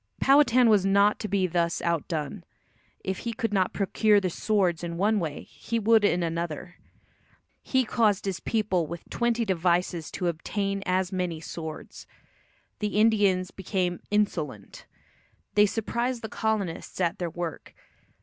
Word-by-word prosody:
Powhatan 270 -3 +5
was 210 -4 +5
not 200 +2 +3
to 215 - -3
be 195 -2 +1
thus 170 -1 0
outdone. 170 +1 -2 0.6
If 190 -1 -3
he 235 - -4
could 225 -3 -2
not 190 -2 +2
procure 205 +1 +3
the 185 -3 -2
swords 185 -4 0
in 170 -1 -4
one 210 +3 +2
way 155 -5 -4
he 230 - -5
would 225 0 +4
in 180 -3 +2
another. 170 +1 -4 0.8
"He 260 -1 +1
caused 210 -4 +1
his 195 -3 -2
people 190 -7 0
with 170 +1 -8
twenty 235 -1 0
devices 175 -2 0
to 180 - -3
obtain" 195 +4 -2
as 185 0 +1
many 180 -4 -2
swords. 160 -1 -8 0.7
The 210 -1 -2
Indians 200 -4 +3
became 185 -2 -2
"insolent." 160 - -2 0.7
They 210 0 +5
surprised 235 +3 -2
the 220 - -4
colonists 210 -8 -2
at 170 -2 0
their 175 -2 -2
work. 175 0 -6
190 Hz, 145 wpm, -27 LUFS, 170-215 Hz, 0.8 s, Powhatan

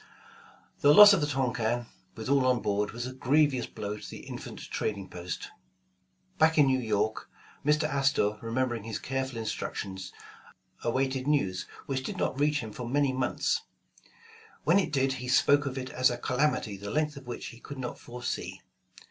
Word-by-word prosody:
The 145 +1 +6
loss 205 0 +11
of 190 - +2
the 145 - +1
Tonquin, 120 -4 0 0.3
with 110 -1 -6
all 140 0 +3
on 125 -1 +3
board, 105 -1 0
was 120 +1 -5
a 130 - -5
grevious 130 -1 +2
blow 105 0 -5
to - - -9
the - - -8
infant - - -8
trading 100 -3 -2
post. 90 0 -6 0.9
Back 160 0 +4
in 150 - +7
New 130 -1 +2
York, 110 -2 -1 0.3
Mr. 150 +2 +3
Astor, 135 -8 +1
remembering 120 -1 -1
his 110 -2 -4
careful 130 -2 -3
instructions, 95 -4 -4 0.7
awaited 130 0 0
news 100 -12 +1 0.2
which 135 -1 -2
did - - -5
not 135 - -1
reach 145 0 +2
him 110 -2 -7
for 120 +2 -6
many 140 0 +2
months. 130 -1 0 1.0
When 180 +4 +5
it 195 - -1
did, 135 -2 +2
he 125 - -5
spoke 145 +3 +4
of 135 0 -4
it 130 0 -5
as 130 0 +3
a 120 - -3
"calamity 125 -5 0
the 100 +1 -7
length 150 +4 0
of 140 -2 -11
which 120 - -5
he 115 - -13
could 145 +3 -9
not 125 -2 -5
foresee." 120 0 -5
130 Hz, 175 wpm, -29 LUFS, 115-140 Hz, 1.0 s, loss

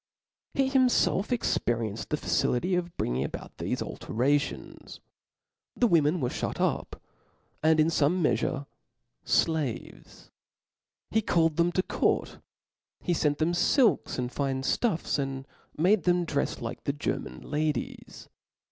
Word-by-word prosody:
He 270 -1 +3
himfelf 250 -6 +3
experienced 115 - -1
the 150 - 0
facility 140 +5 0
of 175 -1 -2
bringing 60 +2 -1
about 70 - -7
thefe - - -2
alterations. 140 +5 -2 0.8
The 245 - +2
women 170 -4 +3
were 125 -4 0
ihut - - -4
up, - - -1 0.6
and 160 0 +4
in 155 +1 +4
fome 165 +2 +2
meafure 135 -1 0 0.6
flaves; 155 -8 -2 0.8
he 220 - +3
called 165 -6 +2
them 170 +1 +3
to 185 - +1
court; - - 0 0.6
he 175 - +1
fent 150 -3 +1
them 160 +2 +1
filks 225 +7 +2
and 125 -1 -2
fine 135 -2 -2
ftuffs, 170 - 0
and 135 -1 -3 0.3
made 185 +4 +3
them 175 -1 +3
drefs 145 -3 -2
like - - -6
the 140 - 0
German 145 - -4
ladies. 150 0 -3
155 Hz, 130 wpm, -28 LUFS, 135-175 Hz, 0.8 s, and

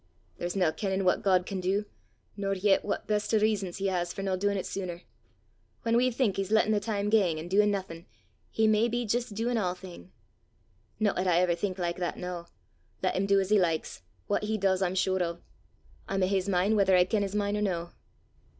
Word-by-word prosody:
There's 175 +2 -3
nae 180 -5 +2
kennin' 190 +1 -2
what 180 - +3
God 185 -3 +3
can 195 -1 -4
do, 195 +3 0 0.5
nor 195 -1 -1
yet 195 +1 +2
what 205 - -3
best 210 +1 0
o' - - +6
rizzons 205 -4 0
he 195 - -3
has 175 -2 0
for 195 - -6
no 190 -1 0
doin' 200 +2 0
't 190 - -3
sooner! 180 -3 -5 0.8
Whan 230 -1 +1
we 250 +2 +4
think 235 -5 0
he's 195 -1 -2
lattin' 220 -1 +4
the 210 - +3
time 205 -1 -2
gang, 190 -8 +3
an' 160 +2 -6
doin' 205 +3 +3
naething, 190 -4 -4 0.4
he 220 - +1
may 215 +1 +4
be 240 +1 -2
jist 235 0 -1
doin' 235 +2 0
a' 180 -4 0
thing! 180 0 -12 0.9
No 210 -2 +2
'at 185 +1 -1
I 175 -2 +3
ever 180 -1 +2
think 185 +2 -3
like 175 -1 -2
that 175 -1 -3
noo; 180 -1 -5 0.6
lat 185 - +1
him 195 +1 0
do 200 0 +4
'at 190 -1 -1
he 210 - +6
likes, 165 - -1 0.2
what 210 - -1
he 215 +1 -1
does 190 -2 +1
I'm 185 -1 0
sure 190 0 +1
o'. 170 -1 -2 0.7
I'm 195 -1 0
o' - - +3
his 195 0 0
min' 195 +3 +2
whether 195 -2 +4
I 180 - +6
ken 210 +2 0
his 200 0 -2
min' 205 0 0
or 210 - -1
no. 175 -4 -2
195 Hz, 225 wpm, -29 LUFS, 180-210 Hz, 0.9 s, o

